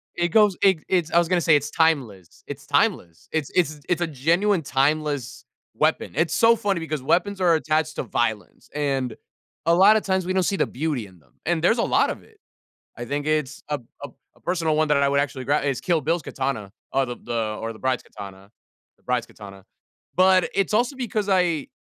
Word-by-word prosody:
it 175 0 0
goes 210 +1 +4
it 190 -4 +4
it's 175 -4 0
I - - +2
was 170 -1 +4
gonna 180 0 +1
say 160 -2 +4
it's 145 0 0
timeless, 125 - -1
it's - - -8
timeless. 85 -1 0
It's 155 -3 -2
it's 155 -5 +1
it's 175 0 +1
a 175 - +1
genuine 170 +7 +1
timeless 145 -1 -1 0.3
weapon. - - 0
It's 160 +1 +1
so 230 +6 +5
funny 200 -4 -1
because 155 -3 -4
weapons 195 +7 +1
are 175 -2 +4
attached 155 -1 0
to - - -1
violence, 110 -4 -3
and, 135 -5 -1 0.5
a 170 +1 +4
lotta 205 +4 +6
times, 190 -3 -1
we 185 - -2
don't 185 0 +1
see 195 - 0
the - - +1
beauty 135 -5 -3
in 90 -2 -19
them, 75 - -30
and 170 0 0
there's 180 +8 +3
a 230 - +1
lot - - +2
of - - -6
it. 440 - -23 0.6
I 120 - -6
think 145 +4 -3
it's 150 -2 -1
a 150 -1 -1
p 125 - -20 0.2
a - - -5
p - - -28 0.2
a - - -24
personal 165 -3 0
one 155 0 +2
that 150 - +3
I 140 0 +3
would 140 0 +2
actually 135 -2 -3
gra 145 +3 +1
is 140 -2 -2
Kill 170 -3 +1
Bill's 165 +4 -1
katana 130 -8 -4 0.2
or 135 0 +2
the 120 -1 -6
the 110 -3 -3
or 115 0 -4
the 110 - -14
bride's 130 -1 0
katana. 100 -1 -11 0.5
The - - -33
bride's 125 -2 -1
katana. 100 -3 -13 0.5
But 185 0 +4
it's 195 -1 0
also 240 +6 +1
because 220 -5 -2
I 175 -6 +1
155 Hz, 215 wpm, -23 LUFS, 130-180 Hz, 0.6 s, lotta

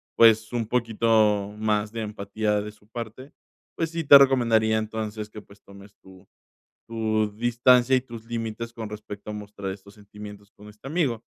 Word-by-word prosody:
pues, 110 -1 +5
un 115 -2 -1
poquito 110 -3 +1
más 105 -1 0
de 115 0 -5
empatía 105 0 -2
de 105 +1 -7
su 105 0 -25
parte. 115 +4 -8 0.4
Pues 165 - -1
sí, 165 -1 -3
te 140 -1 +10
recomendaría, 115 -5 +3
entonces, 110 -1 -4
que, 105 0 -10
pues, 100 0 -20
tomes 100 0 -15
tu 95 0 -17 0.6
tu 110 -2 -1
distancia 120 +2 +4
y 130 - +2
tus 115 -3 -11
límites 115 0 -5
con 110 -2 -7
respecto 105 -1 -9
a - - -6
mostrar 100 -2 -6
estos 100 +1 -11
sentimientos 105 0 -12
con 105 - -16
este 105 +5 -13
amigo. 135 -8 -1
110 Hz, 170 wpm, -25 LUFS, 105-115 Hz, 0.6 s, te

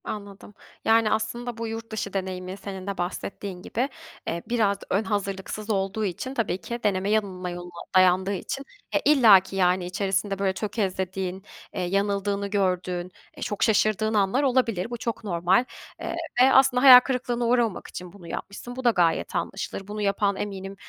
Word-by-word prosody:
Anladım. 205 -1 -8 0.3
Yani, 225 -1 +4
aslında 235 +2 -2
bu 230 0 -3
yurt 225 0 -6
dışı 205 -2 -4
deneyimi 185 -1 -4
senin 195 -1 -7
de 200 - -3
bahsettiğin 180 +1 -5
gibi, 250 +8 -2 0.4
eee, 170 +1 -2
biraz 215 -4 +2
ön 200 +3 +1
hazırlıksız 205 0 -3
olduğu 200 +1 0
için 205 +8 -4
tabii 215 -7 -1
ki 235 +8 -5
deneme 195 -1 +1
yanılma 190 -4 -1
yoluna 175 0 -8
dayandığı 185 +1 +4
için 270 +8 -4 0.3
ya - - +2
illa 240 -10 +8
ki, 190 +1 -10
yani, 180 -1 +2
içerisinde, 195 +2 -1
böyle, 195 -1 +1
tökezlediğin, 190 -2 -3 0.3
eee, - - -3
yanıldığını 200 +2 0
gördüğün, 185 -2 -1 0.2
e, - - -13
çok 205 - -2
şaşırdığın 215 0 +2
anlar 205 +6 +2
olabilir. 240 -7 +1
Bu 240 - -4
çok 230 0 -4
normal, 185 +3 +2 0.4
eee, 335 - -3 0.3
ve 265 +1 +6
aslında 265 -1 +5
hayal 255 -2 +12
kırıklığına 250 -2 -2
uğramamak 235 -4 +1
için 180 -1 -8
bunu 185 -4 -13
yapmışsın. 200 +8 -7
Bu 260 - -6
da 245 - +5
gayet 175 -7 +1
anlaşılır. 195 - -4
Bunu 210 +1 -5
yapan 200 0 +1
eminim, 195 -1 -5
200 Hz, 165 wpm, -25 LUFS, 185-225 Hz, 0.4 s, hayal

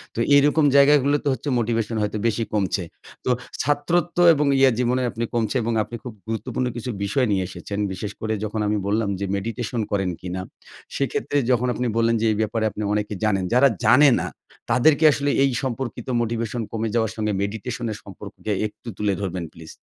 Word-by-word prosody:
তো - - -3 0.2
এইরকম 145 +2 +4
জায়গাগুলোতে 145 0 +4
হচ্ছে 145 - -4
মোটিভেশন 115 -1 -1
হয়তো 105 +1 -1
বেশি 115 0 0
কমছে। 100 -3 0 0.4
তো - - 0 0.3
ছাত্রত্ব 165 +4 0 0.2
এবং 150 0 +1
ইয়ে 135 -1 +6
জীবনে 125 +1 +1
আপনি 115 - -4
কমছে। 115 +1 0
এবং 115 +1 -1
আপনি 120 - -8
খুব 125 - -7
গুরুত্বপূর্ণ 125 +3 -2
কিছু 120 +2 -5
বিষয় 125 +6 +1
নিয়ে 95 -2 +1
এসেছেন। 100 +2 -6
বিশেষ 100 +2 -5
করে 110 0 -1
যখন 110 +1 -3
আমি 105 - +1
বললাম 105 0 +1
যে 100 - -1
মেডিটেশন 115 +3 -3
করেন 95 -3 0
কিনা? 90 0 -4 0.5
সেক্ষেত্রে 140 +1 -1
যখন 125 0 +2
আপনি 125 0 -2
বললেন 115 0 +3
যে - - +1
এই 105 - -1
ব্যাপারে 110 +1 -1
আপনি 105 - -5
অনেক 105 0 0 0.2
জানেন। 100 -3 +1
যারা 130 +3 +6 0.2
জানে 140 +5 +7
না, - - -3 0.4
তাদেরকে 145 +5 +4
আসলে 145 0 -1
এই 135 - +3
সম্পর্কিত 125 -2 -4
মোটিভেশন 115 0 -2
কমে 115 0 -2
যাওয়ার 110 -2 +1
সঙ্গে 105 -2 -1
মেডিটেশনের 110 +2 -3
সম্পর্ককে 105 +2 -8 0.2
একটু 110 - -18
তুলে 105 -1 0
ধরবেন 90 -3 -3
প্লিজ। 80 -1 -11
115 Hz, 180 wpm, -23 LUFS, 105-130 Hz, 0.5 s, জানে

